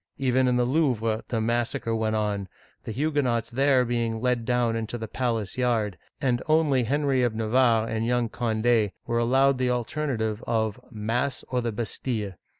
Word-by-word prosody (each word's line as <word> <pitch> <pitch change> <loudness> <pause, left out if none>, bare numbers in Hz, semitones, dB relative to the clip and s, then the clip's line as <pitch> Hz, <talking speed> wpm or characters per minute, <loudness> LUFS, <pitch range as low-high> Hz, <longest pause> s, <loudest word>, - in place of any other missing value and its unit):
Even 130 -1 +2
in 125 - +2
the 125 - +2
Louvre, 120 -6 +1
the 115 - -1
massacre 115 0 -1
went 110 -1 0
on, 105 -2 -1 0.4
the - - -4
Huguenots 135 -3 0
there 135 0 +3
being 115 -2 -1
led 125 -1 0
down 120 -2 +1
into 115 +1 -3
the 110 -1 -5
palace 115 -1 -2
yard, 115 -6 +1 0.2
and 125 -3 +1
only 155 -5 +3
Henry 140 +1 +1
of 120 -3 +1
Navarre 115 0 +2
and 110 0 -2
young 120 0 +1
Cond6 110 -2 +1
were 115 -1 0
allowed 130 +3 +3
the 130 -1 +1
alternative 120 -3 -1
of 110 -2 0
Mass 120 +5 -2
or 125 -1 0
the 115 -1 -2
Bastille 110 -1 -3
120 Hz, 165 wpm, -26 LUFS, 110-130 Hz, 0.4 s, there